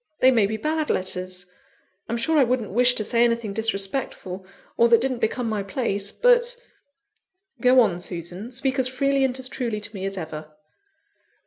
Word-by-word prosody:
They 260 - +6
may 225 -5 +3
be 220 +2 -3
bad 310 +5 -1
letters. 185 -1 -3 0.6
I'm 235 - -1
sure 320 +7 +1
I - - +6
wouldn't 240 -4 -1
wish 245 +3 +4
to 215 - 0
say 235 +2 +2
anything 230 -3 0
disrespectful, 195 -3 -3 0.3
or 235 - +5
that 230 -1 +6
didn't 255 0 -1
become 235 +2 -1
my 215 -2 -1
place; 200 -1 -2
but - - +3 0.5
" 370 -9 -33
"Go 255 +1 +6
on, 190 -7 +1
Susan 180 +5 -4
speak 265 +1 -1
as 255 - +3
freely 275 +1 +1
and 260 -1 0
as 260 -1 -4
truly 240 -5 -3
to 210 +1 -5
me 195 -2 -5
as 195 0 -5
ever." 155 -2 -7
235 Hz, 185 wpm, -24 LUFS, 195-260 Hz, 0.6 s, They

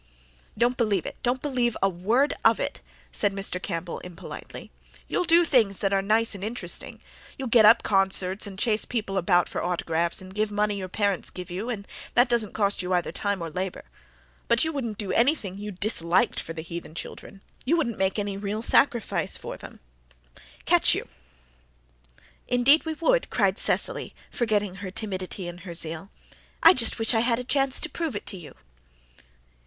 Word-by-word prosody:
"Don't 245 +1 +2
believe 205 -6 +1
it - - -5
don't 250 +1 -1
believe 250 -5 0
a 195 - +3
word 215 +10 +1
of - - +5
it," - - -3 0.3
said 205 - 0
Mr. 195 -2 -3
Campbell 170 +1 -4
impolitely. 180 -2 -9 0.4
"You'll 360 - 0
do 340 +1 +6
things 225 - +3
that 195 -1 0
are 195 - +3
nice 220 +3 +1
and 195 -1 -8
interesting. 230 +4 -3 0.4
You'll 265 -3 -4
get 230 -2 +6
up 225 +2 +7
concerts, 195 0 +1
and 195 -2 -9
chase 215 +1 +2
people 215 -5 -1
about 175 -2 +3
for - - -4
autographs 170 -1 0
and 185 0 -10
give 210 +1 -1
money 210 0 +1
your 190 -2 -4
parents 200 -1 0
give 180 -1 -8
you 200 +7 -4
and 200 -4 -4 0.3
that 245 +1 +5
doesn't 235 -4 +1
cost 200 -2 +1
you 180 0 -2
either 175 -1 0
time 200 -3 -2
or 165 - -5
labour. 185 +2 -4 0.6
But 235 +1 +3
you 320 0 -1
wouldn't 235 -7 -3
do 205 -4 -3
anything 230 - +1
you 210 +1 -5
disliked 190 +1 +1
for 165 - -6
the 160 -1 -6
heathen 170 -2 -8
children 195 +3 -8 0.2
you 325 +7 +2
wouldn't 235 -9 -1
make 190 +1 +1
any 200 -1 -2
real 205 +2 -3
sacrifice 235 -2 +2
for - - -7
them - - -12 0.8
catch - - +4
you!" - - -4 1.4
"Indeed 270 +6 +4
we 320 - -2
would," - - +1
cried - - +1
Cecily, - - -1 0.2
forgetting 210 -5 0
her 195 0 -6
timidity 190 -3 -4
in 175 0 -7
her 175 -1 -8
zeal. 165 +3 -3 0.5
"I - - +10
just 235 -8 +1
wish 225 +2 +2
I 225 - +3
had 235 0 +2
a 250 - -3
chance 270 +1 +1
to - - 0
prove 325 -6 -4
it - - -5
to 195 - -3
you." 165 -4 -11
205 Hz, 185 wpm, -26 LUFS, 185-240 Hz, 1.4 s, I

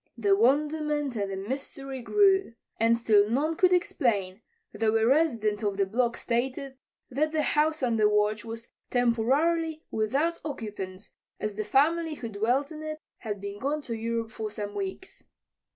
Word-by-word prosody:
The 200 -4 +3
wonderment 295 +3 +1
and 200 -2 -1
the - - -3
mystery 265 +5 -5
grew. 385 - +3 0.2
And 230 +1 +4
still 210 -3 +4
none 295 +7 +1
could 365 +2 +4
explain, 225 - +1 0.3
though 225 0 +2
a 220 - +2
resident 230 -7 +2
of 205 -2 -1
the 200 - +3
block 235 +4 0
stated 260 +3 -2 0.4
that 305 +4 +1
the 310 -1 +1
house 305 0 +1
under 225 -4 +3
watch 210 +1 +1
was 230 0 -7 0.2
temporarily 290 +7 +1
without 275 +10 0
occupants, 210 -9 -6 0.3
as 215 -1 -2
the 215 +1 -3
family 310 +8 +2
who 235 -5 -6
dwelt 240 +8 0
in 310 -1 -7
it 310 0 -4 0.2
had 210 -3 -4
been 200 +1 -6
gone 290 +4 -1
to 235 - -5
Europe 230 0 -2
for 220 -1 -4
some 205 -1 -5
weeks. 200 - -6
235 Hz, 160 wpm, -28 LUFS, 215-300 Hz, 0.4 s, And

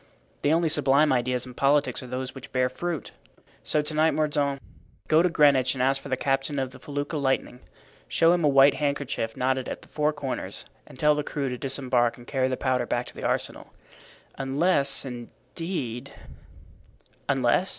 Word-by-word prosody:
The 145 - +2
only 165 +1 +3
sublime 145 -1 +4
ideas 125 0 0
in 125 - -10
politics 140 +3 +2
are 130 - -9
those 130 +1 -4
which 135 -1 -11
bear 130 -1 +1
fruit. 170 +5 -4 0.5
So 150 - 0
to 150 - -4
night, 155 +1 +3
Mordaunt, 145 -2 0 0.5
go 155 +1 +5
to 180 - +3
Greenwich 140 -5 +4
and 125 - 0
ask 135 +1 +2
for 140 - -9
the 130 - 0
captain 135 +2 -1
of 130 -1 -2
the - - -13
felucca 145 +2 -4
Lightning. 135 -2 -1 0.5
Show 165 +1 +4
him 175 -2 0
a - - +5
white 135 0 +6
handkerchief 140 -6 -2
knotted 130 0 0
at - - -6
the - - -17
four 150 0 0
corners 145 -3 -5 0.2
and - - -14
tell 150 +2 +4
the 150 - -1
crew 145 -2 -3
to 125 - -4
disembark 130 -3 0
and 120 - -13
carry 130 -1 0
the 130 -1 -2
powder 125 -2 0
back 120 0 -1
to - - -14
the - - -8
arsenal, - - -3 0.7
unless, 140 +1 +1
indeed——" 125 +1 -6 1.2
"Unless?" 135 +6 +2
135 Hz, 180 wpm, -26 LUFS, 130-150 Hz, 1.2 s, white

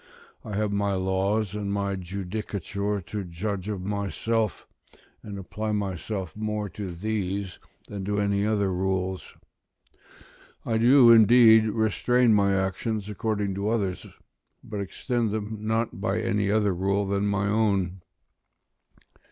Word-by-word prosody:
I 105 - -6
have 105 0 0
my 100 -1 0
laws 95 +2 0
and 105 -1 -3
my 100 -1 -1
judicature 100 +2 -4
to 100 +4 -5
judge 95 +3 -4
of 100 -3 -4
myself, 100 +1 -2 0.5
and 100 -2 -8
apply 105 +3 -4
myself 95 -2 -3
more 105 -1 -3
to 95 +1 -6
these 100 -1 -3 0.3
than 100 -2 -6
to 105 +1 0
any 100 0 +1
other 100 -3 +1
rules: 95 0 -2 1.3
I 110 -1 0
do, 120 +1 +7
indeed, 110 0 +7
restrain 110 +2 +2
my 100 -1 +3
actions 100 +2 -2
according 105 -1 -1
to 100 +2 -2
others; 100 -6 -1 0.6
but 105 -2 -5
extend 115 +4 -2
them 110 +1 -4
not 110 -1 -2
by 100 +3 0
any 105 -3 0
other 105 -2 +2
rule 100 +3 0
than 100 +1 0
my 100 -1 0
own. 100 -4 +1
100 Hz, 130 wpm, -26 LUFS, 95-110 Hz, 1.3 s, do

